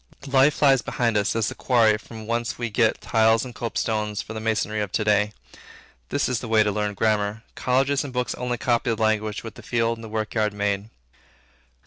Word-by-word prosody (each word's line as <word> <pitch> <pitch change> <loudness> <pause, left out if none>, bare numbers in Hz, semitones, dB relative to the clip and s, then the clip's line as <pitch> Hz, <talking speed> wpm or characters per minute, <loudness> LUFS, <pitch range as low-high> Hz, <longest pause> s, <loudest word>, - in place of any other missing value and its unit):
Life 135 +2 +3
lies 135 -3 +5
behind 115 -3 -1
us 105 +1 +1
as 115 -3 +1
the - - -6
quarry 115 -4 +3
from 110 0 -10
whence 115 +1 -2
we 120 -2 -3
get 110 +1 +2
tiles 110 +1 +3
and 125 - -8
copestones 110 -3 -2
for 110 - -8
the 110 - -4
masonry 110 -1 -1
of 100 -3 -3
to 110 - +1
day. 105 0 +2 0.8
This - - 0
is 125 -2 -1
the 120 - -7
way 110 -1 +4
to 105 - 0
learn 105 0 -2
grammar. 105 +1 0
Colleges 135 +2 +1
and 140 - -6
books 125 -1 -1
only 125 -1 -3
copy 120 0 0
the 115 - -1
language 110 -1 0
which 115 - -7
the - - -12
field 115 -1 0
and - - -10
the 110 - -8
work 110 -1 -3
yard 105 -2 +1
made. 100 0 -1
110 Hz, 210 wpm, -24 LUFS, 105-120 Hz, 0.8 s, lies